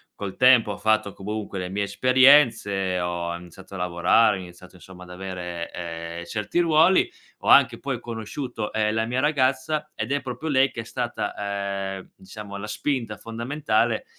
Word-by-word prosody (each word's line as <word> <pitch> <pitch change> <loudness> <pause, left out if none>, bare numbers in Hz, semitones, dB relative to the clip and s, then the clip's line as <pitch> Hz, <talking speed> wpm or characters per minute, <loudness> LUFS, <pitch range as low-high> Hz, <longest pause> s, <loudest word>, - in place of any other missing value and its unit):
Col 100 -2 -6
tempo 125 -4 +5
ho - - -5
fatto 110 -2 +1
comunque 105 0 -5
le 90 -1 -4
mie 100 +2 -2
esperienze, 120 -6 +4
ho 85 -1 -2
em 85 - -7
iniziato 90 +2 -14
a - - -5
lavorare, 90 +4 +3
ho - - -7
iniziato, 90 0 -13
insomma, 90 +1 -13
ad 90 - -14
avere, 90 -2 -6
ehm, 85 0 -6
certi 105 - -2
ruoli. 170 - +4 0.3
Ho - - -8
anche 130 -4 +6
poi 135 -3 -3
conosciuto, 115 0 -5
ehm, 110 0 0
la 110 0 0
mia 125 +3 -1
ragazza, 150 +2 0
ed - - -4
è 140 0 +1
proprio 130 +5 -6
lei 135 -2 +3
che 115 - -5
è - - -9
stata, 100 -5 -3
ehm, 95 - -12
diciamo 100 +1 -9
la 105 +2 -6
spinta 115 -2 -2
fondamentale 115 +1 -1
105 Hz, 175 wpm, -24 LUFS, 95-130 Hz, 0.3 s, anche